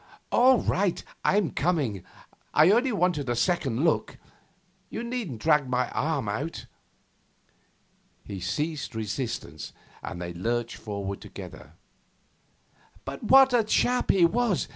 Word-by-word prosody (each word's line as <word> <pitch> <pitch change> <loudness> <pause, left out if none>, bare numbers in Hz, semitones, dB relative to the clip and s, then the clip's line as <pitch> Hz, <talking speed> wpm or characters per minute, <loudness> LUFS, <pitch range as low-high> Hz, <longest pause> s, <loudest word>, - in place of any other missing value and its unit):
'All 255 +1 +6
right, 190 -2 0 0.2
I'm 200 -5 +2
coming. 140 - -1 0.5
I 155 +5 +6
only 245 +4 +3
wanted 180 -8 +1
to - - 0
look - - -4
a - - +1
second. 155 -3 +1 0.9
You - - -5
needn't 235 - -4
drag 150 -4 +3
my 125 0 0
arm 150 -7 -1
out.' 135 +11 -4 1.6
He 100 - -7
ceased 150 - -3
resistance, 110 - -4 0.3
and 85 - -6
they 85 0 -5
lurched 115 +6 -2
forward 100 -2 -5
together. - - -10 1.3
'But 135 +8 -6
what 265 +2 +7
a 240 -2 +4
chap 245 +3 +1
he 180 -3 +5
was! 225 +1 +1
150 Hz, 125 wpm, -27 LUFS, -, 1.6 s, what